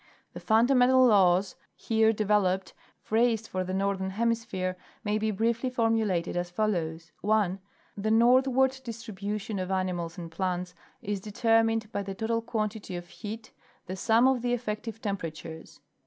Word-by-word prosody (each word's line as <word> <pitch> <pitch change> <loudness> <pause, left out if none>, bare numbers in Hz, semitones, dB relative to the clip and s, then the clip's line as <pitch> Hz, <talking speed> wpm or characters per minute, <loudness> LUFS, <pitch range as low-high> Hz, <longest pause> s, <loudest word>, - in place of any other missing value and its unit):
The - - -7
fundamental 250 +3 +4
laws 190 -4 +4 0.2
here 220 -1 +2
developed, 205 -3 +1 0.3
phrased 225 0 +1
for 185 0 -2
the 185 - -5
northern 190 0 -1
hemisphere, 220 -3 -1 0.3
may 210 0 0
be 220 0 0
briefly 230 +4 0
formulated 225 -8 0
as 175 0 -2
follows: 170 -5 -2
(1) 205 -3 +1 0.4
The 205 +2 -2
northward 260 +3 +4
distribution 215 -3 -5
of 185 0 -3
animals 185 -2 -2
and 170 -2 -7
plants 180 0 -2 0.3
is 205 0 -2
de 210 - -8
termined 225 0 +2
by 200 - -2
the 195 -1 -6
total 230 +3 -1
quantity 215 -4 -3
of 175 0 -7
heat—the 215 -3 -9
sum 225 +5 +3
of 265 -2 +2
the 245 0 0
effective 225 -1 -4
temperatures. 165 -5 -6
215 Hz, 140 wpm, -28 LUFS, 185-230 Hz, 0.4 s, fundamental